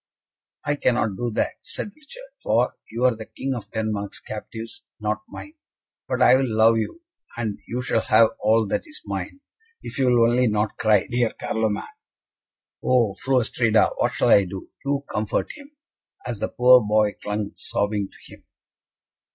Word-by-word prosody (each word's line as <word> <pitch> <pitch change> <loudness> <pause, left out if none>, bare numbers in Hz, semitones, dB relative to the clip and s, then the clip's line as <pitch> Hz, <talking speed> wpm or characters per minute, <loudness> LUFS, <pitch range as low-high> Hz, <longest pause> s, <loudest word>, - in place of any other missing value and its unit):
"I 145 0 0
cannot 110 -7 +1
do 120 +5 -2
that," - - 0
said 210 - -6
Richard; - - -13
"for - - +1
you 115 +2 -3
are 125 -2 +4
the 110 0 -9
King 135 0 -4
of 120 -4 -6
Denmark's 105 -2 -3
captives, 110 +1 -8 0.2
not 105 0 -1
mine; 300 - -9 0.5
but 130 -1 +1
I 125 - +7
will 135 0 +1
love 115 +1 +5
you, 330 - -5 0.3
and 110 -4 -3
you 125 +1 -3
shall 115 -2 +1
have 110 +1 +5
all 110 +1 +3
that 100 - -1
is 305 - -11
mine, 280 - -5 0.4
if - - -6
you 135 - +3
will 120 -2 +5
only 125 +1 +3
not 105 0 0
cry, 110 -4 +3
dear 120 -2 0
Carloman. 110 -2 -1 1.0
Oh, 120 -5 +3
Fru 130 +5 +1
Astrida, 110 -2 +2
what - - +1
shall - - +1
I 100 - +6
do? 95 +1 -8
You 140 0 -1
comfort 105 0 -2
him 295 0 -15 0.2
" - - -31
as 120 -4 -4
the - - -2
poor 125 0 +6
boy 105 -1 +2
clung 105 0 -3
sobbing 100 -1 -2
to - - -14
him. - - -16
115 Hz, 175 wpm, -23 LUFS, 105-125 Hz, 1.0 s, I